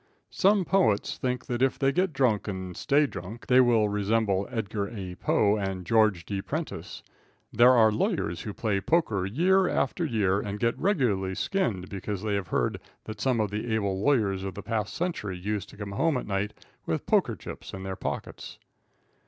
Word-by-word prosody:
Some 200 -1 +3
poets 175 - +1
think 125 -1 -2
that 120 0 -3
if 135 0 +2
they 135 -1 +2
get 180 +5 +1
drunk, 125 -8 +1
and 95 -3 -5
stay 145 - +3
drunk, 110 -2 -8
they 130 0 +6
will 115 -4 +4
resemble 105 -1 0
Edgar 105 -4 -3
A. 95 -5 -6
Poe 100 +3 +2
and 95 -3 -3
George 105 -4 +3
D. 100 0 -3
Prentice. - - -5 0.5
There 120 +3 +7
are 110 -3 +5
lawyers 85 -5 -1
who 105 - -5
play 100 -2 -1
poker 105 - +1
year 180 - +3
after 135 +6 0
year, 105 - +1
and 100 0 -4
get 115 +1 +1
regularly 115 - +1
skinned, 105 - -1
because 100 0 -5
they 105 -2 -1
have 100 -3 -1
heard - - 0 0.2
that 110 -2 -8
some 125 -1 +1
of 105 -2 0
the 110 +3 -3
able 100 -3 -1
lawyers 105 -8 +2
of 95 -2 -5
the 100 - -7
past 105 -1 -2
century 160 - -3
used 100 +2 -3
to - - -14
come 100 -1 -6
home 155 +8 +1
at - - -4
night 100 +1 -2 0.3
with - - -2
poker - - +2
chips - - -9
in 95 - -7
their 95 0 -4
pockets. - - -6
105 Hz, 185 wpm, -27 LUFS, 100-125 Hz, 0.5 s, There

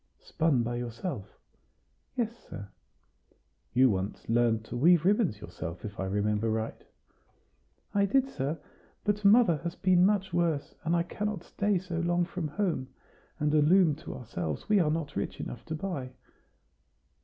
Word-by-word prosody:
"Spun 155 -7 +1
by 120 +1 -2
yourself?" 120 - -5 0.8
"Yes, 235 -2 -1
sir." 100 - -7 1.0
"You 130 0 +5
once 95 +1 -3
learned 115 -1 +2
to 120 - -7
weave 165 +6 +5
ribbons 195 - +2
yourself, 85 -1 -7
if 105 0 -7
I 95 - -1
remember 105 +3 0
right?" 110 0 -2 1.1
"I 200 0 +3
did, 270 +6 +3
sir; 150 - -3 0.5
but 210 0 0
mother 200 -5 +6
has 170 +2 -5
been 185 -2 +4
much 195 -2 +2
worse, 170 -4 0
and 165 +2 +1
I 170 - +2
cannot 210 0 -3
stay 205 +1 0
so 175 -2 -4
long 175 +1 +1
from 175 -2 -4
home; 160 -5 -1 0.5
and 150 0 +1
a 155 - +5
loom 170 +1 +5
to - - -8
ourselves 85 - -4
we 210 -1 +4
are 160 -4 +3
not 150 -2 -2
rich - - -3
enough 120 - -6
to 160 - -4
buy." 150 -7 -4
160 Hz, 155 wpm, -29 LUFS, 120-185 Hz, 1.1 s, mother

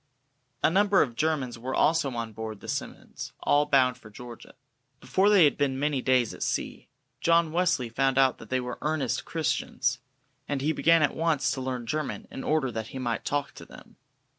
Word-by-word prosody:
A - - +4
number 200 +1 +4
of 120 -5 -6
Germans 140 -5 -1
were 130 +3 -4
also 160 -2 +2
on 115 -1 -4
board 110 -1 -6
the - - -12
"Simmonds," - - -6
all 145 0 +3
bound 130 -3 +3
for 110 - -14
Georgia. 120 +2 -11 0.4
Before 195 +2 +2
they 200 -4 +6
had 145 - +3
been 135 -2 +1
many 145 -1 0
days 125 -3 +2
at - - -12
sea, - - -3 0.3
John 165 -1 +3
Wesley 165 -7 +1
found 135 +3 0
out 135 -1 +3
that 115 - -12
they 130 - +1
were 125 0 -5
earnest 140 -7 -1
Christians, 160 -2 -1 0.5
and 140 -1 -2
he 145 +4 +1
began 165 0 +4
at - - +1
once 155 -5 +1
to 130 - -3
learn 130 -2 -4
German 155 +4 -3
in 135 - -6
order 150 -4 0
that 110 -1 -5
he 135 - -8
might 120 -3 -2
talk 145 0 -2
to - - -12
them. - - -15
135 Hz, 195 wpm, -27 LUFS, 125-155 Hz, 0.5 s, they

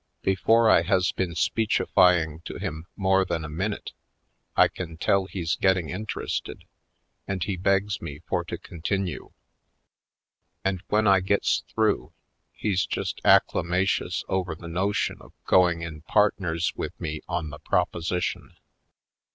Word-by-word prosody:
Before 110 +5 +3
I 95 - +6
has 90 +1 +2
been 90 -3 -3
speechifying 90 -5 +2
to - - -6
him 80 +3 -5
more 95 -1 +3
than 85 -3 -3
a - - -6
min 95 +8 -1
ute - - -8 0.7
I - - +7
can 85 -3 -7
tell 95 +3 +2
he's 90 -3 -2
getting 95 -4 +2
interested 105 +4 -4 0.6
and 95 -3 -2
he 95 0 -2
begs 100 +3 +1
me 75 -3 -7
for - - -1
to - - -5
continue. 90 +1 -4 1.4
And 95 -2 0
when 110 +1 +2
I 100 -1 +6
gets 95 +2 +1
through - - 0 0.4
he's 95 -3 -1
just - - -3
acclamatious 90 +3 +2
over 95 -3 -1
the 85 - -10
no 95 +5 0
tion - - -1
of - - -16
going 85 -2 +4
in 80 -2 -7
partners 90 -2 +1
with - - -5
me 80 -1 -4
on 85 -3 -2
the 75 - -9
proposition. 85 +1 -1
90 Hz, 145 wpm, -26 LUFS, 85-95 Hz, 1.4 s, I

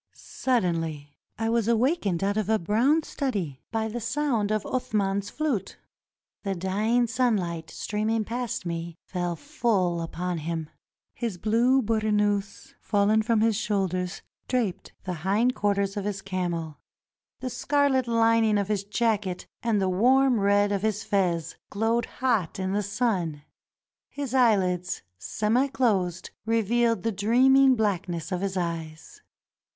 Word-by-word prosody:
Suddenly 165 - -2 0.2
I 225 - -1
was 230 -2 +1
awakened 230 - +1
out 200 +1 +1
of 215 -1 -1
a 220 - +4
brown 235 - +2
study 195 - -3
by 220 -1 -1
the 230 +2 -4
sound 240 -4 0
of 215 -1 0
Athman's 200 -5 -1
flute. 280 -11 -2 0.6
The 195 -2 -2
dying 210 +7 +1
sunlight 210 -9 0
streaming 215 +1 -1
past 240 -4 -3
me 170 0 -4
fell 175 -2 -2
full 200 - 0
upon 175 +1 -3
him. 160 0 -4 0.4
His 230 -7 -4
blue 235 +7 +3
burnous, 210 -2 0
fallen 210 +1 +2
from 220 0 +1
his 225 -1 +3
shoulders, 190 -4 -1 0.2
draped 220 -7 -1
the 185 - -3
hind 210 +8 +2
quarters 200 -2 0
of 200 -1 -3
his 200 -2 -3
camel. 175 -5 -3 0.6
The 255 -1 -4
scarlet 280 -3 +1
lining 230 -2 +3
of 200 0 -1
his 205 -2 0
jacket 205 -3 -1 0.2
and 225 -3 +1
the 190 - +1
warm 250 +6 +4
red 205 +1 +3
of 200 -2 0
his 215 0 -1
fez 175 -5 0
glowed 225 +3 0
hot 230 -10 -1
in 190 0 -2
the 205 +1 +1
sun. 190 -8 -1 0.7
His 280 -3 -5
eyehds, 190 -8 +2 0.2
semi 225 - +1
closed, 195 -10 0
revealed 230 -1 +1
the 225 - +1
dreaming 255 +6 +5
blackness 180 -6 -1
of 180 0 -1
his 195 -1 -2
eyes. 165 - -5
210 Hz, 135 wpm, -26 LUFS, 185-235 Hz, 0.7 s, dreaming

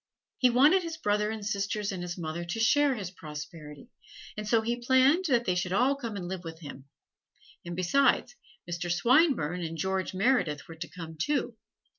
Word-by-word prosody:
He 255 - +5
wanted 290 +10 +5
his 335 -2 -5
brother 210 -6 0
and 220 -2 -5
sisters 200 0 -2
and 185 -2 -5
his 175 0 -5
mother 165 0 -4
to 175 +6 -4
share 280 +4 +3
his 195 -6 -5
prosperity, 150 -3 -9 0.4
and 210 0 -5
so 225 +1 +3
he 240 +2 -2
planned 265 +8 +4
that 240 -6 +2
they 180 - +1
should 180 0 -2
all 255 +7 +3
come 235 -6 -6
and 180 -3 -5
live 185 -1 -5
with 160 -1 -8
him; 140 -3 -9 0.8
and 175 0 -6
besides, 270 - +2 0.3
Mr. 175 0 -3
Swinburne 230 - +3
and 165 -1 -4
George 190 +1 -2
Meredith 190 - +1
were 165 - -9
to 160 +2 -7
come, 165 -2 -9
too. 255 - -1
200 Hz, 185 wpm, -29 LUFS, 170-250 Hz, 0.8 s, He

